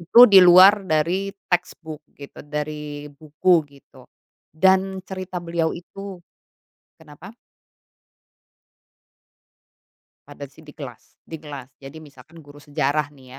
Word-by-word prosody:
Itu 210 +9 +7
di 190 - +9
luar 185 +3 +7
dari 170 +6 -1 0.2
textbook 165 -3 -3 0.2
gitu, 140 -1 -12
dari 150 0 -7
buku 155 +4 +1
gitu. 140 -2 -20 0.4
Dan 190 +3 +1
cerita 185 -1 -8
beliau 170 -1 -1
itu 195 +3 -10 0.9
kenapa? 150 +6 -14 2.9
Pada 145 0 -11
sih 140 - -21
di 150 -2 -16
kelas 125 -6 -12
di 160 - -10
kelas. 140 -4 -11
Jadi 145 +3 -12
misalkan 155 +2 -17
guru 145 0 -16
sejarah 145 0 -2
nih 130 -2 -18
155 Hz, 110 wpm, -21 LUFS, 145-180 Hz, 2.9 s, di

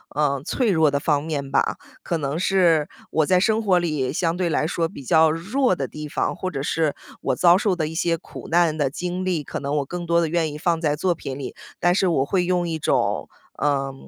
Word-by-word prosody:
呃， 140 -2 +1
脆 235 - 0
弱 160 -4 +4
的 140 0 0
方 145 -1 +1
面 145 -4 -4
吧。 140 - +1 0.2
可 170 - -2
能 145 +1 -2
是 175 -5 +3 0.2
我 160 - +2
在 185 -1 +4
生 220 +3 +2
活 195 -4 +3
里， 155 -7 -1
相 165 +2 0
对 180 -1 0
来 155 - +1
说 165 0 0
比 140 - -10
较 160 +4 +4
弱 195 - +1
的 135 -6 -3
地 150 0 -7
方， - - -1
或 185 +1 -3
者 135 -6 -4
是 155 0 0 0.3
我 - - 0
遭 175 -1 +6
受 195 0 +1
的 160 -3 -1
一 160 - -6
些 165 0 0
苦 - - -11
难 170 -2 +3
的 145 -4 0
经 180 +5 -4
历。 180 -5 -1
可 - - -5
能 140 +1 -2
我 140 - 0
更 175 +4 -6
多 170 0 +3
地 165 - +1
愿 160 -1 0
意 150 - -7
放 165 +1 0
在 150 -3 +1
作 175 +4 +1
品 135 -5 -6
里， 140 - -6 0.3
但 175 0 +3
是 190 +1 +2
我 150 -6 +2
会 180 +3 +1
用 180 -1 0
一 160 -1 -3
种， - - 0 0.3
呃， 135 -2 0
165 Hz, 255 characters per minute, -23 LUFS, 150-180 Hz, 0.3 s, 遭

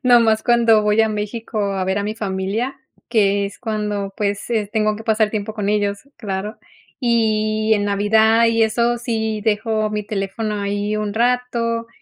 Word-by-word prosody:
nomás 230 -3 +4
cuando 230 -2 +4
voy 210 +1 +3
a 220 - +3
México 215 +2 -4
a 190 -1 -1
ver 190 +2 0
a - - -1
mi 210 +1 -3
familia, 205 +5 -2 0.3
que 200 -3 +2
es 200 - -10
cuando 210 -3 -3
pues 205 +1 -2
es 215 -3 -1
tengo 215 -1 +1
que 220 - -10
pasar 220 -1 +2
tiempo 215 0 -4
con 205 -2 -2
ellos, 205 -1 0 0.2
claro. 205 0 -4 0.4
Y 220 -2 +1
en 205 - 0
navidad 220 +3 +3
y 230 0 +2
eso 235 +2 +2
sí, 220 -2 -2
dejo 215 0 0
mi 210 0 -3
teléfono 210 +1 -3
ahí 205 +1 -1
un 210 -1 -3
rato 235 -1 0
215 Hz, 170 wpm, -20 LUFS, 205-225 Hz, 0.4 s, nomás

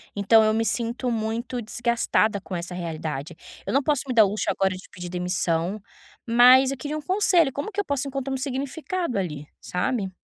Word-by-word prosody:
então, 220 +2 +5
eu 215 0 +3
me 225 +1 0
sinto 240 +2 -1
muito 230 +2 -2
desgastada 230 -2 0
com 190 - -6
essa 175 +1 -5
realidade. 160 -3 -5 0.3
Eu - - -3
não 275 - +4
posso 290 -1 +1
me 255 - -1
dar 225 -2 +7
luxo 205 +2 -2
agora 190 -1 0
de 185 - -11
pedir 180 -1 -8
demissão, 180 +1 -1 0.5
mas 250 +3 +7
eu 275 - -4
queria 300 +2 -4
um - - -5
conselho. 355 -3 +3
Como 285 - -5
que 410 - -4
eu 405 - 0
posso 280 -1 -1
encontrar 270 0 -3
um - - -1
significado 280 - -3
ali, 150 -6 -4
sabe? 195 +2 -2
230 Hz, 195 wpm, -24 LUFS, 185-270 Hz, 0.5 s, dar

